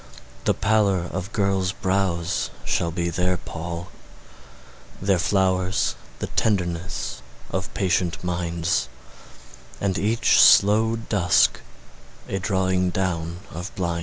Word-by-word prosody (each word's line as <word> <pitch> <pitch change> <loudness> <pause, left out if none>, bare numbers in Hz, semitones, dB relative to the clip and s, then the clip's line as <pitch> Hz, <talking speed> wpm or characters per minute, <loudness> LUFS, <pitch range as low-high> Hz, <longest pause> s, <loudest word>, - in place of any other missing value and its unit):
The - - +3
pallor 100 -4 +2
of 95 +3 -4
girls' 95 -3 0
brows 95 -4 -1 0.2
shall 85 - 0
be 85 0 -2
their 90 +1 +1
pall; 85 +1 -6 1.1
Their 95 -2 +2
flowers 95 0 +1 0.2
the - - -3
tenderness 85 - -1 0.3
of - - -3
patient 90 -3 0
minds, 85 -4 -1 0.9
And 95 -1 0
each 110 +3 +3
slow 110 +3 +6
dusk 100 -6 +2 0.7
a 95 - -2
drawing 95 -1 +1
down 90 -2 -2
of 90 +4 -6
blinds. 85 -2 -1
90 Hz, 105 wpm, -23 LUFS, 85-100 Hz, 1.1 s, slow